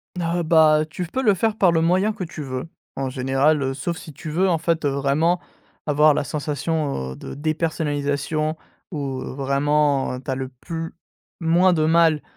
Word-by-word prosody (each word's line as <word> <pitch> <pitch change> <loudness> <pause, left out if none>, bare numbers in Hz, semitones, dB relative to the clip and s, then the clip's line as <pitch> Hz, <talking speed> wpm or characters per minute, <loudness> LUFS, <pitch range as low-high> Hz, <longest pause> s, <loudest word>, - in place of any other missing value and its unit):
Heu, 175 0 -1
bah, 155 -2 +5
tu 180 - -4
f 170 - -15
peux 260 - -1
le 215 -6 +4
faire 220 +3 0
par 185 -5 +5
le 165 - +2
moyen 185 +6 +2
que 190 - -5
tu 165 -2 -7
veux. 130 0 -4 0.3
En 135 -1 -2
général, 135 +4 +2
heu, 135 0 -1
sauf 170 +5 -3
si 155 - -10
tu 155 +3 -8
veux, 185 +4 +2
en 170 - +2
fait, 165 0 0
heu, - - +3
vraiment, 140 +6 +1 0.5
avoir 150 0 +5
la - - 0
sensation, 145 - -2
heu, - - -10
de 70 - -8
dépersonnalisation 155 0 -1 0.3
ou 140 -5 -3
vraiment, 140 0 +1
heu, - - -6
tu 135 - -3
as 130 - 0
le 130 -1 -4
plus 165 +1 -5 0.4
moins 175 +2 +4
de 155 -2 +2
mal 160 -2 +4
155 Hz, 195 wpm, -22 LUFS, 140-165 Hz, 0.5 s, bah